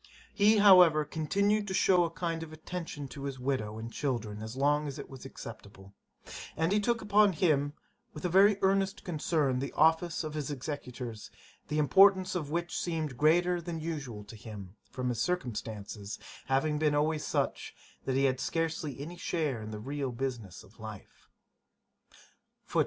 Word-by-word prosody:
He, 210 +1 +5
however 180 -7 +7
continued 200 +8 0
to 190 - -2
shew 180 -2 +4
a 170 - 0
kind 165 -1 -3
attention 160 -2 -6
to 140 0 -7
his 135 -1 -4
widow 125 -5 -2
and 115 +1 -7
children 110 -7 -2
as 110 +2 -6
long 145 +2 +2
as 140 0 -6
it 140 - -8
was 135 -1 -10
acceptable; 100 -6 -10 0.6
and 160 +3 +1
he 205 - +3
took 235 +2 0
upon 205 -1 +4
him, 145 -4 +2 0.4
with 200 - -8
a - - +4
very 195 +3 +5
earnest 195 0 +1
concern, 150 -5 0
the 140 - -3
office 165 +1 +3
of 155 - -4
one 155 - -4
of - - 0
his 140 - -5
executors, 125 -5 -6 0.4
the 150 - -2
importance 190 +5 +5
of 155 -6 -3
which 170 +2 -2
seemed 160 -6 -2
greater 175 +5 +3
than 170 -1 -5
usual 145 -10 -5
to 105 +2 -12
him, 105 -3 -9
from 130 -1 -3
his 120 -2 -1
circumstances 110 - -3 0.3
having 150 +3 +1
been 150 -1 +2
always 150 +1 +1
such, - - -2 0.3
that 130 - 0
he 135 - +2
had 130 -1 +2
scarcely 160 -4 -2
any 165 +5 -7
share 155 -9 -1
in 110 - -7
the 110 - -5
real 135 +4 -3
business 120 -6 -5
of 105 - -20
life. 110 -3 -11
150 Hz, 170 wpm, -30 LUFS, 125-175 Hz, 0.6 s, however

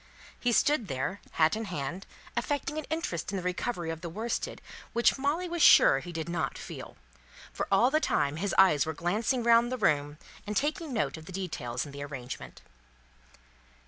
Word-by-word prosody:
He 245 - +1
stood 260 -1 +3
there, 140 +8 -3
hat 160 +2 +3
in 220 +1 -3
hand, 175 +1 -5 0.3
affecting 290 +1 -1
an 310 - -6
interest 315 - -2
in 200 - -2
the 185 - -4
recovery 180 -1 -2
of 165 0 -6
the 170 - -5
worsted 220 +7 -3 0.3
which 235 0 +4
Molly 300 +6 0
was 345 -1 -3
sure 135 - +8
he 175 - -8
did 160 -1 -4
not 170 -1 -2
feel; - - -9 0.6
for - - -3
all 230 +7 +5
the 310 - +3
time 145 - 0
his 200 +4 -1
eyes 180 -7 +6
were 160 - -3
glancing 215 - 0
round 235 +1 +5
the 255 - -1
room, 145 -8 +1 0.3
and 210 - -1
taking 305 +1 -1
note 165 - -1
of 160 - -11
the - - -8
details 160 -10 -3
in 145 - -9
the 140 0 -8
arrangement. 135 -4 -8
190 Hz, 185 wpm, -29 LUFS, 155-245 Hz, 0.6 s, sure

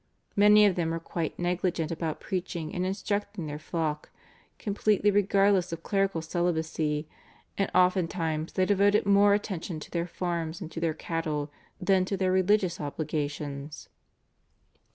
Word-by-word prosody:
Many 210 +1 +7
of 200 - +4
them 170 -2 -1
were 165 0 -2
quite 165 -1 -4
negligent 175 -2 -1
about 160 -1 -3
preaching 175 -4 -4
and 180 +1 -1
instructing 200 -1 -2
their 150 0 -5
flock, 155 -2 -3 0.5
completely 205 0 +1
regardless 195 -2 +3
of 165 0 -6
clerical 195 -5 0
celibacy, 160 -3 -1 0.5
and 195 - 0
oftentimes 170 -3 +1
they 185 - +2
devoted 205 +1 +3
more 200 0 +5
attention 185 -5 -4
to - - -11
their 170 0 -1
farms 170 -2 -3
and 170 -3 -7
to - - -5
their 165 -2 0
cattle 155 -3 -3 0.3
than 185 0 +3
to 195 +1 -2
their 185 -1 +1
religious 185 -1 +2
obligations. 145 -1 -4
175 Hz, 140 wpm, -28 LUFS, 160-195 Hz, 0.5 s, Many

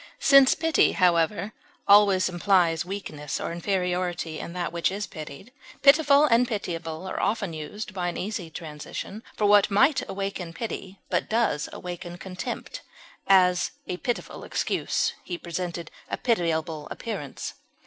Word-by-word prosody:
Since 275 -1 +6
pity, 325 0 +3
however, 180 +4 +2 0.3
always 200 -2 +6
implies 175 -3 +2
weakness 170 -6 -5
or - - -3
inferiority 175 -2 -2
in 170 - -6
that 175 -2 -3
which 170 +1 +1
is 200 +1 -3
pitied, 155 - -9 0.3
pitiful 285 0 +6
and 245 -2 +4
pitiable 170 -6 -4
are 190 - -4
often 205 -6 0
used, 185 +7 -6
by 180 -2 -2
an 175 - -3
easy 195 -4 -4
transition, 160 +6 -7 0.2
for 210 - +1
what 205 -1 +6
might 260 +7 +4
awaken 195 -3 -4
pity, 195 -2 -6
but - - 0
does 215 -10 +1
awaken 175 -1 -7
contempt; 190 - -6 0.5
as, 180 -2 +5 0.2
a 180 - -4
pitiful 240 +5 -4
excuse; - - -1
he 175 - -5
presented 170 -1 -5 0.2
a - - -2
pitiable 165 -8 0
appearance. 195 - -5
185 Hz, 140 wpm, -26 LUFS, 170-210 Hz, 0.5 s, Since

